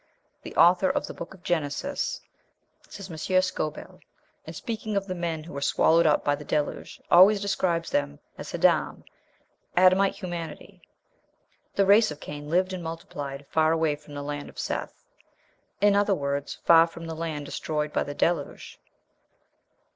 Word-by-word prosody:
"The - - -10
author 180 +2 +5
of - - -1
the - - -8
Book 170 +3 -9
of 180 - -21
Genesis," 175 - -2 0.7
says 195 -2 -9
M. 160 - -7
Schoebel, 185 -3 -1 0.5
"in - - -8
speaking 220 -3 -4
of 195 - -1
the 185 - -4
men 170 -3 -3
who 170 - -11
were 140 - -5
swallowed 160 +4 +3
up 150 - +3
by 145 - +3
the 145 - -5
Deluge, 150 0 -3
always 195 +4 +7
describes 180 -4 -1
them 70 - -1 0.2
as - - -8
'Haadam,' - - +1 0.7
'Adamite 185 +2 +5
humanity.'" 175 -4 -7 0.9
The 200 - +3
race 205 +3 +5
of 150 -1 -7
Cain 145 0 -8
lived 185 +3 +1
and 180 -2 -5
multiplied 145 -4 -6
far 160 0 +3
away 160 -2 +1
from 145 0 -14
the 145 - -5
land 145 0 -5
of - - -17
Seth; - - -4 0.8
in 205 0 +5
other 205 -1 +3
words, 140 -2 -3
far 165 0 +7
from 165 0 -10
the 165 - -5
land 160 -2 -4
destroyed 150 +1 -3
by - - +1
the 145 - -4
Deluge. 165 -3 -2
165 Hz, 160 wpm, -26 LUFS, 150-185 Hz, 0.9 s, always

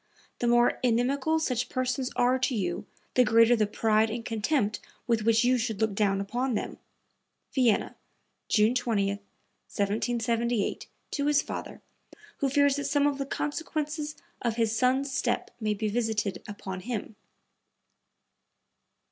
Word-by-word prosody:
The 240 - 0
more 240 0 +4
inimical 260 +6 +2
such 250 -6 -1
persons 255 0 -1
are 250 +1 +3
to 255 0 0
you 180 -5 -2 0.3
the 250 - +5
greater 230 +1 +5
the 215 -2 +1
pride 220 +1 +2
and 230 +1 -5
contempt 220 0 0 0.3
with 230 -2 +1
which 225 +1 +3
you 250 +1 +3
should 225 -3 -2
look 220 -2 +1
down 195 -1 +1
upon 245 +5 -1
them." - - -4 0.7
(Vienna, 245 -6 +2 0.5
June 215 +2 +4
20, 220 -5 +1
1778, 225 +3 -2 0.2
to 285 0 -1
his 295 -1 +3
father, - - -7 0.5
who 275 - 0
fears 285 0 +3
that 285 - -3
some 285 +1 +2
of 285 -1 +1
the 275 - -2
consequences 300 0 -3 0.3
of 235 -2 0
his 225 -1 +1
son's 260 +3 +2
step 255 -1 -1
may 215 -2 0
be 215 +1 -2
visited 215 -4 -1
upon 190 -2 -6
him.) 220 0 -5
235 Hz, 140 wpm, -28 LUFS, 215-260 Hz, 0.7 s, the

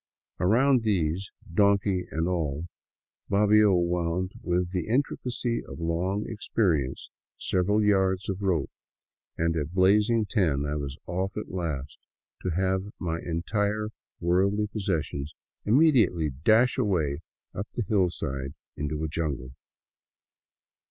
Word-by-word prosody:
Around 125 +8 +4
these, 95 -3 0 0.2
donkey 100 -2 +2
and 80 +2 -1
all, 80 -4 -1 0.6
Bobbio 105 0 +5
wound 85 +1 0
with 90 0 0
the 90 0 -2
intricacy 125 -1 -1
of - - -10
long 90 +5 -1
experience 90 - -1 0.3
several 105 +4 +1
yards 95 -2 +2
of 95 0 -3
rope, 90 -7 0 0.7
and 85 0 +1
at 80 +2 -3
blazing 105 +4 +4
ten 80 -10 +1
I 75 - -2
was 70 -2 -4
off 95 +3 -3
at 105 - -5
last 75 -6 -4 0.2
— - - -40
to 95 - -2
have 95 +3 0
my 85 -2 -2
entire 105 +6 -1 0.3
worldly 95 +5 +2
possessions 85 -8 -3 0.3
immediately 110 - +4
dash 110 - +3
away 80 - +1 0.3
up 100 +3 -4
the 120 - 0
hillside 80 -9 -1 0.2
into 75 +1 -3
a - - 0
jungle. 75 -5 -3
95 Hz, 120 wpm, -27 LUFS, 80-105 Hz, 0.7 s, Bobbio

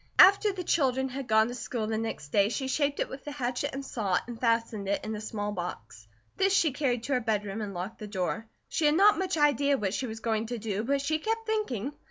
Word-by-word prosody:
After 400 +2 +7
the 375 -2 -5
children 265 -5 +1
had 265 0 -5
gone 220 0 +4
to - - -5
school 235 -2 -3
the 220 +1 -1
next 225 -10 -4
day 200 +5 +3
she 265 +3 -2
shaped 285 +1 0
it - - 0
with 265 0 -9
the 295 - -6
hatchet 255 0 -2
and 275 0 -5
saw, 200 -8 0
and 235 -1 -8
fastened 230 -4 0
it 200 - -1
in 220 - -3
a 210 - -5
small 210 -1 -3
box. 115 - -6 0.3
This 385 0 +3
she 320 -6 +3
carried 250 -4 -1
to 275 - -1
her 255 - +3
bedroom 210 -2 -1
and 205 -2 -4
locked 180 +5 -5
the 215 - -6
door. 200 +2 -2 0.2
She 310 - +1
had 295 - +3
not 405 +3 +6
much 375 -3 -1
idea 285 -1 +3
what 200 -5 -1
she 255 +5 -2
was 225 0 -6
going 220 0 -1
to 240 +1 -3
do, 215 -1 -2
but 275 +3 +1
she 310 +3 0
kept 450 +5 -2
thinking. 295 - -2
240 Hz, 250 wpm, -29 LUFS, 215-285 Hz, 0.3 s, After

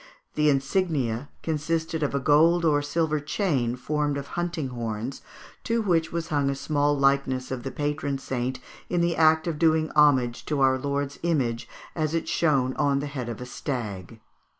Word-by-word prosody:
The 150 0 +3
insignia 140 -4 0
consisted 160 +1 -1
of 145 -1 0
a - - +2
gold 160 +5 +4
or 145 -2 +3
silver 155 +1 0
chain 145 - 0
formed 145 +2 -1
of 140 0 -6
hunting 170 -5 -3
horns, 115 +1 -4 0.4
to 230 0 +1
which 170 -7 +1
was 170 0 -3
hung 145 -2 +1
a 140 - -1
small 145 +1 +1
likeness 135 -2 +1
of 130 -2 -3
the 135 - -4
patron 145 0 -2
saint 130 -1 -3 0.3
in 175 -1 +1
the 170 -1 +1
act 160 0 +4
of 165 -3 -3
doing 160 -1 +3
homage 130 -6 +3
to 150 -2 -1
our 130 -1 +4
Saviour's 140 0 -2
image 135 -9 -1 0.3
as 155 0 -1
it 165 - -2
shone 135 -6 +2
on 140 -1 +2
the 140 - -2
head 135 -4 -5
of 115 - -6
a - - -5
stag. 115 -6 -5
145 Hz, 175 wpm, -26 LUFS, 130-160 Hz, 0.4 s, gold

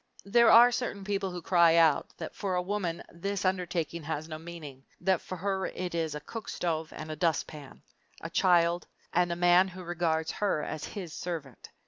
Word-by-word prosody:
There 235 +3 +5
are 240 +2 +8
certain 235 -5 -3
people 195 -1 -1
who 180 -2 -7
cry 170 -2 +5
out 160 -3 +4
that - - -6
for 195 -3 -2
a 180 - +1
woman 180 -3 -2
this 195 +3 -3
undertaking 175 -3 -1
has 155 0 -4
no 155 -1 -6
meaning 155 -5 -9 0.2
that 185 -1 +1
for 185 - -6
her 190 +1 -1
it 180 -1 -5
is 160 -3 -1
a - - -4
cook 225 +9 -8
stove 160 -2 -2
and 155 0 -7
a - - -4
dustpan, 155 -3 -2 0.4
a - - -7
childbed, 175 -1 +3 0.3
and 175 0 +2
a - - -1
man 175 +2 +5
who 185 0 -9
regards 165 -2 -1
her 200 -7 -1
as 155 -1 -5
his 180 -6 -7
servant. 160 -8 -6
175 Hz, 190 wpm, -29 LUFS, 160-190 Hz, 0.4 s, are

